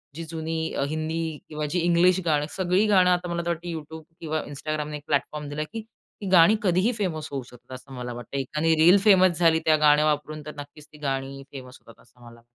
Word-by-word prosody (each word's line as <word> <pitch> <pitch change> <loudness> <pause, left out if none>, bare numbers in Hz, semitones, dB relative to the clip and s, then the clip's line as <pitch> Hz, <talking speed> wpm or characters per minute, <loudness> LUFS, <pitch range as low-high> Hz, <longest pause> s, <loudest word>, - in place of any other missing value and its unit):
जी 165 - -6
जुनी 160 0 -3
अ, - - -1
हिंदी 160 0 -3
किंवा 150 -1 -4
जी 180 - +1
इंग्लिश 175 +2 +3
गाणी, 150 -2 +1
सगळी 185 +2 +2
गाणं 185 -3 +4
आता 180 0 +1
मला 170 0 -2
तर - - -1
वाटत 170 +1 -3
YouTube 160 -1 -7 0.2
किंवा 155 -1 -2
Instagramने 150 +1 -4
एक 145 - -14
प्लॅटफॉर्म 150 0 -1
दिला, 150 +1 -3
की 225 +8 -7 0.4
ती 200 - -4
गाणी 185 +3 +6
कधीही 185 +5 +2
फेमस 160 -7 -3
होऊ 135 -2 -4
शकतात, 125 +1 -12
असं 135 +1 -12
मला 125 -1 -5
वाटतं. 120 +3 -7
एखादी 155 +4 0
रिल 180 +3 +8
फेमस 185 -5 +5
झाली 165 -2 +4
त्या 155 - +5
गाण्या 150 +1 +5
वापरून 150 0 -1
तर 150 - -8
नक्कीच 145 +1 -11
ती - - -13
गाणी 135 0 -3
फेमस 130 -2 -10
होतात, 115 - -18
असं 120 -1 -21
मला 115 0 -14
155 Hz, 215 wpm, -25 LUFS, 145-175 Hz, 0.4 s, रिल